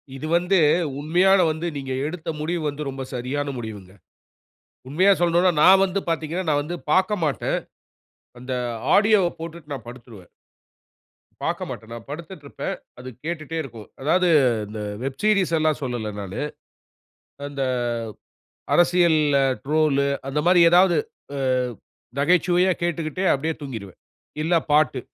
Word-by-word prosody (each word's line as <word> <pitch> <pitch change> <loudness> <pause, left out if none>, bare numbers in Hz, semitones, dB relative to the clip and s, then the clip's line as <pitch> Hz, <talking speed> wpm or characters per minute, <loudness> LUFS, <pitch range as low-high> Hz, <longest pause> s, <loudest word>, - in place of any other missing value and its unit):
இது 135 +4 -5
வந்து 180 +3 +2 0.4
உண்மையான 180 +6 +3
வந்து, 160 +2 -4
நீங்க 135 -1 -5 0.2
எடுத்த 160 0 -6
முடிவு 170 +2 -2
வந்து 145 +1 -5
ரொம்ப 135 0 -5
சரியான 130 +4 -3
முடிவுங்க. 105 -5 -8 1.0
உண்மையா 185 +8 +4
சொல்லணுன்னா 175 +1 +3
நான் 190 +1 +7
வந்து 190 +1 -2
பார்த்தீங்கன்னா, 165 +2 -2
நான் 145 -1 +2
வந்து 170 +4 -5 0.2
பார்க்க 190 +3 +2
மாட்டேன். 150 -3 0 0.8
அந்த 125 +1 -6 0.4
ஆடியோவை 205 -4 +4
போட்டுட்டு 165 -2 -8
நான் 125 -5 -7
படுத்துருவேன். 115 -7 -12 1.1
பார்க்க - - -2
மாட்டேன். 110 0 -8
நான் 115 -1 -9
படுத்துட்டு 160 +1 -8
இருப்பேன். 140 - -4 0.2
அது 125 +1 -8 0.2
கேட்டுட்டே 165 -1 -4
இருக்கும். 115 -6 -10
அதாவது 180 +6 +2 0.4
இந்த 105 +1 -7 0.2
வெப் 135 0 -5
சீரியஸ் 200 -6 +3
எல்லாம் 155 -1 +1
சொல்லல 120 -4 -3
நானு. 100 +3 -5 1.1
அந்த 140 -1 -3 1.1
அரசியல்ல 170 -4 +4 0.3
ட்ரோலு 145 -1 +2 0.2
அந்த 145 +2 -1
மாரி 180 0 +6
ஏதாவது. 180 +1 +5 0.4
ஆ - - -4 0.8
நகைச்சுவையா 180 +4 +3
கேட்டுக்கிட்டு 170 0 -2
அப்டியே 155 +4 -1
தூங்கிடுவேன். 110 -10 -8 0.4
இல்ல 165 +3 0 0.2
பாட்டு. 150 -3 +3
155 Hz, 125 wpm, -23 LUFS, 135-175 Hz, 1.1 s, நான்